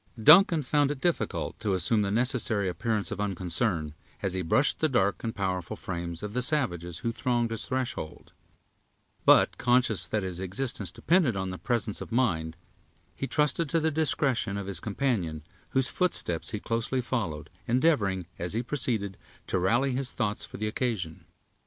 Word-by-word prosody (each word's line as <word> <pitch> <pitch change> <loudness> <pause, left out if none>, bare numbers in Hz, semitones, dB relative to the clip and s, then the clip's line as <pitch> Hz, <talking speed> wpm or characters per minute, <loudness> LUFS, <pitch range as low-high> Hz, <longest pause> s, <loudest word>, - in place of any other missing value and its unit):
Duncan 160 - +7
found 145 +1 +2
it 145 -2 -3
difficult 175 +3 -1
to 100 -3 0
assume 105 +5 +2
the 100 - 0
necessary 110 -3 +1
appearance 105 +4 -1
of 105 0 -3
unconcern, 90 -4 -1 0.3
as 95 - 0
he 95 - -1
brushed 110 - +2
the 155 - +2
dark 100 -7 +1
and 115 - -3
powerful 95 -3 -2
frames 85 -1 -5
of 105 0 -5
the 125 - 0
savages 90 - +1
who 115 - +1
thronged 120 -1 0
its 115 -1 -3
threshold; 130 -11 -4 0.9
but, - - +5
conscious 120 -8 +2
that 105 +1 -1
his 90 -2 -3
existence 100 0 -2
depended 160 - +2
on 95 -1 -2
his 90 - -8
presence 115 -4 -1
of - - -7
mind, 85 -10 0 0.6
he 135 - -3
trusted 150 +2 +1
to 165 - +2
the 160 0 +1
discretion 140 -9 0
of 100 - -4
his 95 -3 -2
companion, 100 - -1 0.3
whose 130 -1 +1
footsteps 90 - -1
he 105 - -4
closely 115 +4 -1
followed, 85 - -3 0.2
endeavoring, 115 - +2
as 90 +2 -3
he 115 - 0
proceeded, 115 -7 -2 0.3
to 95 - 0
rally 120 +9 +2
his 130 0 -1
thoughts 105 -3 -1
for - - -8
the 110 - -2
occasion. 105 -8 -3
110 Hz, 170 wpm, -28 LUFS, 95-130 Hz, 0.9 s, Duncan